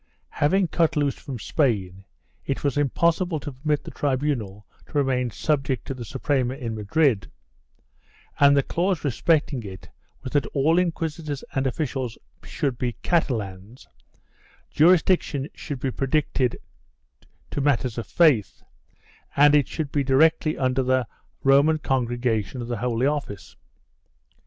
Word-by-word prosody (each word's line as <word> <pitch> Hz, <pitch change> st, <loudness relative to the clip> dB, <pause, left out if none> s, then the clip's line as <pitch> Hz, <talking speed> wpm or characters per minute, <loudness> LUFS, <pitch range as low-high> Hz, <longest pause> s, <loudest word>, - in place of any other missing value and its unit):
Having 180 Hz, +4 st, +2 dB
cut 165 Hz, -1 st, +1 dB
loose 145 Hz, -2 st, +1 dB
from 135 Hz, -3 st, -7 dB
Spain, 100 Hz, -, -1 dB, 0.4 s
it 135 Hz, -, -3 dB
was 140 Hz, -2 st, 0 dB
impossible 165 Hz, +4 st, +1 dB
to 145 Hz, -, -6 dB
permit 145 Hz, +3 st, -1 dB
the -, -, -9 dB
tribunal 130 Hz, -8 st, -2 dB, 0.2 s
to -, -, -19 dB
remain 130 Hz, -3 st, +1 dB
subject 135 Hz, +1 st, -1 dB
to -, -, -4 dB
the 125 Hz, -2 st, -7 dB
Suprema 130 Hz, +1 st, -1 dB
in 120 Hz, -5 st, -5 dB
Madrid, 110 Hz, +2 st, +1 dB, 1.1 s
and 140 Hz, 0 st, +6 dB
the 140 Hz, -, +3 dB
clause 180 Hz, +3 st, -1 dB
respect 150 Hz, +3 st, +1 dB
ing 130 Hz, -, -3 dB
it 95 Hz, -3 st, -10 dB, 0.3 s
was 130 Hz, -, -6 dB
that 145 Hz, -, +2 dB
all 155 Hz, +5 st, +3 dB
inquisitors 160 Hz, -4 st, -3 dB
and 135 Hz, 0 st, 0 dB
officials 130 Hz, -3 st, -3 dB, 0.3 s
should 135 Hz, -6 st, -3 dB
be 120 Hz, -2 st, -1 dB
Catalans, 110 Hz, -, -2 dB, 0.8 s
jurisdiction 165 Hz, -4 st, +3 dB
should 145 Hz, -5 st, -6 dB
be 130 Hz, +1 st, -2 dB
restricted 135 Hz, -2 st, 0 dB, 0.9 s
to 145 Hz, -, -2 dB
matters 130 Hz, -4 st, 0 dB
of 115 Hz, -, -6 dB
faith, 145 Hz, -, +2 dB, 0.7 s
and 145 Hz, +1 st, +6 dB
it 145 Hz, -2 st, +4 dB
should 155 Hz, -4 st, -4 dB
be 145 Hz, -, +1 dB
directly 155 Hz, +4 st, +3 dB
under 130 Hz, 0 st, +1 dB
the 130 Hz, -1 st, +1 dB, 0.4 s
Roman 140 Hz, +4 st, +5 dB
Congregation 120 Hz, -5 st, -1 dB
of 120 Hz, -, -5 dB
the 120 Hz, -, -2 dB
Holy 120 Hz, +2 st, 0 dB
Office. 140 Hz, -9 st, -3 dB
135 Hz, 135 wpm, -24 LUFS, 125-150 Hz, 1.1 s, and